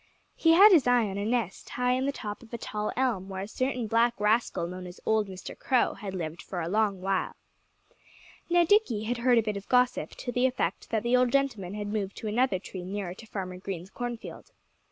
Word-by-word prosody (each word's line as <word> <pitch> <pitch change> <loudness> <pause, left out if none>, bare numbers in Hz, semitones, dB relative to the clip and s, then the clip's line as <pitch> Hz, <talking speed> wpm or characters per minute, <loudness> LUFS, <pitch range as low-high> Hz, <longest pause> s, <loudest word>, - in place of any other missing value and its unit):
He 325 -1 +4
had 400 +5 +9
his 320 -9 +5
eye 245 -2 +4
on 195 0 -4
a 200 - -2
nest 225 -4 -2
high 250 0 0
in 260 +2 +1
the - - +1
top 210 -6 -6
of 235 - -16
a 235 - -4
tall 210 -1 -3
elm, 230 -8 0
where 190 0 -4
a - - -6
certain 255 +1 -2
black 230 +2 +2
rascal 210 -3 +1
known 180 +1 -7
as 175 - -11
old 220 -1 +2
Mr. 190 -1 -8
Crow 255 -2 +1
had 195 -2 -7
lived 165 -1 -4
for 185 - -6
a 165 - -2
long 205 0 +1
while. 190 0 -1 1.1
Now, 345 0 +4
Dickie 325 - +3
had 235 +2 -2
heard 245 0 +4
a 230 - +4
bit 210 -1 -2
of 200 - -10
gossip, 250 0 +2
to 245 - -5
the 245 +2 +3
effect 255 - -2
that 220 -1 0
the 240 +1 +3
old 250 -1 +3
gentleman 225 -9 0
had 210 -1 -4
moved 200 -2 -3
to 220 - -5
another 235 -1 +2
tree 185 0 -8
nearer 190 -1 -4
to 225 +4 -13
Farmer 185 -3 -5
Green's 185 -1 -6
cornfield. 240 -1 -6
220 Hz, 225 wpm, -28 LUFS, 195-250 Hz, 1.1 s, had